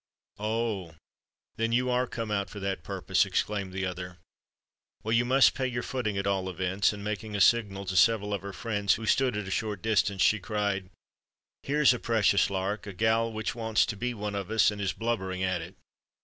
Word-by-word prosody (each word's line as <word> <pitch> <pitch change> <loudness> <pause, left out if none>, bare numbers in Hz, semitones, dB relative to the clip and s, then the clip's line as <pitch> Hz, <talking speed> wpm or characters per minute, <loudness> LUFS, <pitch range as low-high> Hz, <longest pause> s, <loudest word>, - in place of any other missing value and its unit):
"Oh! 105 -6 -2 0.6
then, 115 +1 0
you 125 +1 +2
are 125 +1 +1
come 115 -3 -5
out 100 -1 -1
for 105 - -8
that 95 -2 -3
purpose!" - - +1
exclaimed 100 -3 -2
the 95 +1 -2
other. 90 -1 -6 0.9
"Well, 110 - -2
you 115 +1 +3
must 130 +2 +5
pay 130 -1 -1
your 120 -1 -3
footing 110 -6 -2
at 100 - -1
all 95 -1 0
events;"—and 95 +3 0
making 105 0 -4
a - - -1
signal 100 -2 +3
to 95 0 -3
several 105 +1 +3
of 100 - -2
her 100 0 -6
friends 105 -2 0
who 115 - -6
stood 125 -1 +2
at 105 -2 -4
a - - -5
short 105 0 -2
distance, 100 -3 +2
she 110 - +4
cried, 100 -3 -2 0.7
"Here's 145 -1 +4
a 125 - -4
precious 105 -4 +2
lark! 100 +2 -3
a 100 - -6
gal 110 +3 +1
which 110 0 -3
wants 110 -2 +1
to 110 - -4
be 125 +3 -3
one 105 -1 -4
of 100 -2 -4
us, 110 -2 +4
and 105 -1 -6
is 95 -2 0
blubbering 95 -5 -2
at 95 -2 0
it!" 85 +3 -10
105 Hz, 205 wpm, -28 LUFS, 95-115 Hz, 0.9 s, must